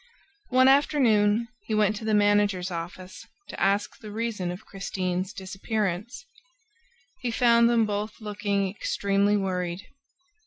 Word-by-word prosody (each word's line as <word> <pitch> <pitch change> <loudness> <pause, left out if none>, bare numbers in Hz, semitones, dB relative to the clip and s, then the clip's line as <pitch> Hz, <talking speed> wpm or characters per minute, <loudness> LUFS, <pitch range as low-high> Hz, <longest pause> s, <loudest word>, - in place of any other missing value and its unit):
One 260 0 +5
afternoon 235 -6 +3 0.2
he 220 - -1
went 215 0 +2
to 220 - -7
the 215 -1 +2
managers' 205 -3 +2
office 175 +2 -7 0.2
to - - -7
ask 200 +1 +1
the 215 - -10
reason 215 -4 -3
of 180 +4 -7
Christine's 185 -1 -3
disappearance. 200 - -4 0.9
He 250 -2 -2
found 235 0 +4
them 230 -2 +3
both 210 +1 -4
looking 205 -2 -1
extremely 200 +1 0
worried. 180 -1 -3
205 Hz, 125 wpm, -26 LUFS, 190-220 Hz, 0.9 s, One